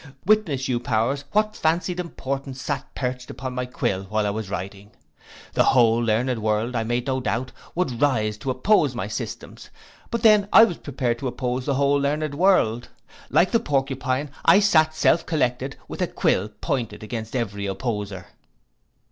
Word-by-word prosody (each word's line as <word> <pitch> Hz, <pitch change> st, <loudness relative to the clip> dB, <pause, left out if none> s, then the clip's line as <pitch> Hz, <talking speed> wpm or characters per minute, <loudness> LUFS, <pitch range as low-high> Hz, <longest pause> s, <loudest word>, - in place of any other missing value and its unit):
Witness 175 Hz, -11 st, +2 dB
you 125 Hz, -2 st, 0 dB
powers 120 Hz, +5 st, -1 dB
what 215 Hz, 0 st, +1 dB
fancied 175 Hz, +3 st, 0 dB
importance 135 Hz, -5 st, -4 dB
sate 145 Hz, +1 st, -2 dB
perched 125 Hz, -1 st, -3 dB
upon 130 Hz, 0 st, -6 dB
my 125 Hz, 0 st, -3 dB
quill 95 Hz, -6 st, -2 dB
while 105 Hz, +2 st, -1 dB
I 100 Hz, -, 0 dB
was 105 Hz, -1 st, -5 dB
writing. 100 Hz, +2 st, -6 dB, 0.6 s
The -, -, +3 dB
whole 115 Hz, -3 st, +4 dB
learned 120 Hz, +2 st, 0 dB
world, 110 Hz, +3 st, 0 dB
I 115 Hz, -, 0 dB
made 120 Hz, +2 st, -1 dB
no 130 Hz, -1 st, 0 dB
doubt, 130 Hz, 0 st, -2 dB, 0.2 s
would 150 Hz, -10 st, -1 dB
rise 110 Hz, -7 st, +2 dB
to 130 Hz, -, -4 dB
oppose 195 Hz, +12 st, +2 dB
my -, -, -3 dB
systems; -, -, -7 dB, 0.4 s
but 235 Hz, -2 st, -3 dB
then 210 Hz, -2 st, +5 dB
I 225 Hz, -, +9 dB
was 195 Hz, -7 st, +1 dB
prepared 125 Hz, -4 st, -2 dB
to 135 Hz, -, -3 dB
oppose 125 Hz, 0 st, -3 dB
the 140 Hz, -, +1 dB
whole 140 Hz, +1 st, +3 dB
learned 150 Hz, +1 st, -1 dB
world. 145 Hz, -, +2 dB, 0.4 s
Like 185 Hz, -, +3 dB
the 230 Hz, -, +4 dB
porcupine 135 Hz, -, -1 dB
I 170 Hz, +4 st, +7 dB
sate 155 Hz, -6 st, +3 dB
self 160 Hz, +1 st, +3 dB
collected, 135 Hz, -4 st, -1 dB
with -, -, -7 dB
a -, -, +2 dB
quill 100 Hz, +3 st, 0 dB
pointed 110 Hz, -1 st, -4 dB
against 110 Hz, +1 st, -5 dB
every 100 Hz, -4 st, -2 dB
opposer. 100 Hz, -3 st, -4 dB
130 Hz, 170 wpm, -23 LUFS, 115-150 Hz, 0.6 s, I